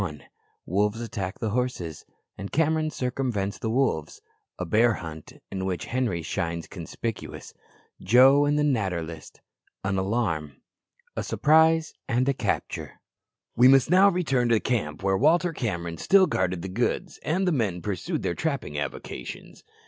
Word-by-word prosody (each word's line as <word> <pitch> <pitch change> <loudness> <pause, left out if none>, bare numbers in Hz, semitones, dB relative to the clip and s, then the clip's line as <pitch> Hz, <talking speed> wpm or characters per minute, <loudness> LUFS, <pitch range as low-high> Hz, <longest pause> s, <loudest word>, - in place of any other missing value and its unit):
Wolves 105 +4 0
attack 100 -4 -4
the 110 - -2
horses, 115 -10 -3 0.3
and 100 - -7
Cameron 160 0 +1
circumvents 125 -8 -2
the 110 - -2
wolves 115 - 0 0.4
A 90 - -3
bear 110 +6 +3
hunt, 80 -3 -8 0.2
in 95 -1 -3
which 95 -2 -2
Henri 115 -10 -1
shines 85 -1 -3
conspicuous 100 +5 -6 0.5
Joe 130 +7 +6
and 145 +1 +2
the 150 - +2
"Natter 100 - 0
list" 80 -1 -10 0.4
An 95 0 0
alarm 95 -8 -1 0.6
A - - -1
surprise 160 +1 +3
and 125 +3 +1
a 140 - +3
capture. - - -3 0.6
We 125 +2 +7
must 135 +3 +5
now 190 +2 +7
return 135 -10 +1
to 115 - +5
the - - +2
camp 95 -12 -2
where 95 0 +2
Walter 170 +4 +3
Cameron 85 - -3
still 195 -1 +5
guarded 90 - -1
the - - -3
goods, 125 - -2
and 185 +4 0
the - - +3
men 110 - 0
pursued 100 -4 -3
their - - 0
trapping 135 - -3
avocations. 60 -3 -7
115 Hz, 150 wpm, -26 LUFS, 90-140 Hz, 0.6 s, We